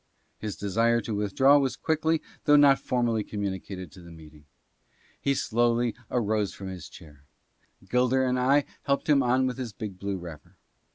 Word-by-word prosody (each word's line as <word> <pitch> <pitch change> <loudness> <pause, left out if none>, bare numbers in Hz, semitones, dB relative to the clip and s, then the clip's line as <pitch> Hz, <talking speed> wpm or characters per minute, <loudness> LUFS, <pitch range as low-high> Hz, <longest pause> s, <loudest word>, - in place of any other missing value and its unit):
His 105 -4 -5
desire 115 +6 +1
to 115 - -5
withdraw 120 +8 +4
was 135 -2 -1
quickly 160 0 0 0.2
though 145 - +6
not 140 -2 +6
formally 120 -3 0
commu 100 -2 -3
nicated 95 -2 -9
to 95 - -14
the 85 - -13
meeting. 75 -2 -15 0.8
He 140 - +1
slowly 120 0 +1 0.2
arose 110 -4 0
from 95 -1 -7
his 90 -4 -8
chair; 75 -4 -15 0.7
Gilder 125 +4 +2
and 125 0 0
I 140 +3 +3 0.2
helped 140 -1 -1
him 145 -2 +4
on 130 +1 +2
with 130 0 -3
his 120 -5 -5
big 100 -2 -7
blue 100 0 -3
wrapper. 85 -4 -11
115 Hz, 170 wpm, -27 LUFS, 95-130 Hz, 0.8 s, though